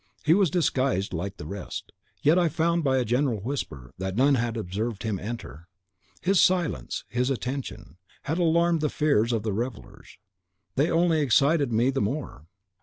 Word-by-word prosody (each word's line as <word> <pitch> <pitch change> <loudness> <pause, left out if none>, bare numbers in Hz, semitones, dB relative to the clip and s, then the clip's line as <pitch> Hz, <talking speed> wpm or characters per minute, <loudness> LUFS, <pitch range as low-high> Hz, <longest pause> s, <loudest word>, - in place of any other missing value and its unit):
He 160 - +6
was 195 -1 +4
disguised 130 - 0
like 95 +4 -4
the - - -8
rest, 90 +4 -7 0.3
yet 160 +5 +5
I 170 -2 +3
found 170 +2 +1
by 135 -2 +2
a 125 - +1
general 120 0 +1
whisper 95 - -5
that 95 0 -3
none 135 +5 +4
had 120 -2 0
observed 105 +2 -3
him 110 -4 -2
enter. 100 -7 -7 0.6
His 190 +1 +4
silence, 170 - +1
his 125 +2 0
attention, 130 - -4 0.3
had 160 +4 -2
alarmed 170 -1 +3
the 150 - +1
fears 125 -7 +2
of 115 -3 -1
the 110 - -1
other 100 - -2
revellers, 120 -2 -7 0.6
they 145 +5 +2
only 165 -1 +3
excited 140 +1 +3
me 120 +4 +2
the 135 - -1
more. 105 - -4
130 Hz, 175 wpm, -26 LUFS, 105-155 Hz, 0.6 s, He